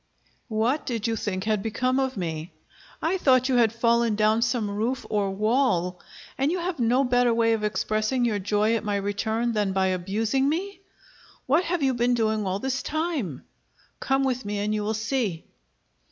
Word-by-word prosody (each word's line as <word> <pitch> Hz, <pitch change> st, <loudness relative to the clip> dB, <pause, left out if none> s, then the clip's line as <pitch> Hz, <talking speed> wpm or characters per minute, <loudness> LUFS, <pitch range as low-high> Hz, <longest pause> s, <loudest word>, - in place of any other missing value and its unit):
"What 235 Hz, +6 st, 0 dB
did 230 Hz, -4 st, -2 dB
you 230 Hz, -1 st, 0 dB
think 190 Hz, -3 st, -3 dB
had 215 Hz, -1 st, 0 dB
become 255 Hz, +5 st, 0 dB
of 265 Hz, -3 st, -1 dB
me?" 165 Hz, -2 st, -4 dB, 0.5 s
"I 365 Hz, +4 st, +1 dB
thought 255 Hz, -4 st, +4 dB
you 255 Hz, -, +3 dB
had 230 Hz, -3 st, +4 dB
fallen 230 Hz, -1 st, +2 dB
down 215 Hz, +1 st, +2 dB
some 225 Hz, -2 st, 0 dB
roof 230 Hz, +6 st, -2 dB
or 205 Hz, -2 st, +1 dB
wall." 195 Hz, -4 st, +1 dB, 0.4 s
"And 275 Hz, +3 st, +2 dB
you 365 Hz, -, 0 dB
have 350 Hz, -3 st, -3 dB
no 245 Hz, +3 st, +3 dB
better 245 Hz, -1 st, +3 dB
way 230 Hz, 0 st, +3 dB
of 220 Hz, -1 st, -2 dB
expressing 215 Hz, +3 st, 0 dB
your 215 Hz, -3 st, 0 dB
joy 210 Hz, +3 st, +1 dB
at 225 Hz, -, -2 dB
my 205 Hz, -1 st, -1 dB
return 220 Hz, +4 st, -1 dB
than 205 Hz, -3 st, 0 dB
by 190 Hz, 0 st, +2 dB
abusing 215 Hz, +9 st, 0 dB
me?" 380 Hz, +5 st, -3 dB, 0.7 s
"What 310 Hz, +7 st, +2 dB
have 345 Hz, -3 st, -1 dB
you 265 Hz, -1 st, +3 dB
been 245 Hz, 0 st, +2 dB
doing 220 Hz, -3 st, 0 dB
all 190 Hz, +1 st, 0 dB
this 265 Hz, +5 st, -2 dB
time?" 305 Hz, -, -3 dB, 0.6 s
"Come 270 Hz, 0 st, +1 dB
with 255 Hz, -1 st, -1 dB
me 205 Hz, 0 st, -3 dB
and 210 Hz, +1 st, -1 dB
you 215 Hz, -, -1 dB
will 215 Hz, +1 st, -1 dB
see." 220 Hz, -6 st, -2 dB
225 Hz, 185 wpm, -25 LUFS, 210-260 Hz, 0.7 s, thought